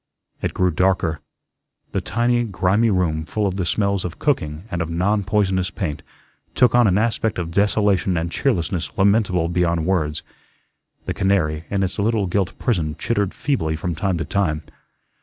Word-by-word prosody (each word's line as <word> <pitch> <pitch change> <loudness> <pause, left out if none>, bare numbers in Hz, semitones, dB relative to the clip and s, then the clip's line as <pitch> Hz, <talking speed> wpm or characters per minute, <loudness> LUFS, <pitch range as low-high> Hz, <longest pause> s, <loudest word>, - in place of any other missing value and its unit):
It - - -2
grew 90 -1 +2
darker. 85 -2 +1 0.7
The - - -1
tiny, 120 +5 +1
grimy 105 +2 +2
room, 85 -5 +1
full 105 +6 -2
of 95 -1 -1
the 90 -3 -1
smells 100 -1 0
of 90 -1 -5
cooking 80 - -1
and 90 - -2
of 85 - -2
"non 100 +5 +1
poisonous" 95 -2 +1
paint, 90 -6 -4 0.5
took 125 -3 +4
on 120 -2 +5
an 95 0 +3
aspect 110 0 0
of 85 -2 -3
desolation 100 -1 +2
and 85 +1 -2
cheerlessness 90 - -1
lamentable 95 -4 +3
beyond 85 -1 0
words. 80 -5 0 0.8
The - - -2
canary 85 -5 0
in 100 -1 0
its 95 +2 -3
little 105 0 +1
gilt 95 +1 -1
prison 80 -10 -1
chittered 100 +1 0
feebly 80 - -1
from 85 +2 -3
time 95 +2 -1
to 85 - -3
time. 80 -6 0
95 Hz, 165 wpm, -21 LUFS, 85-105 Hz, 0.8 s, on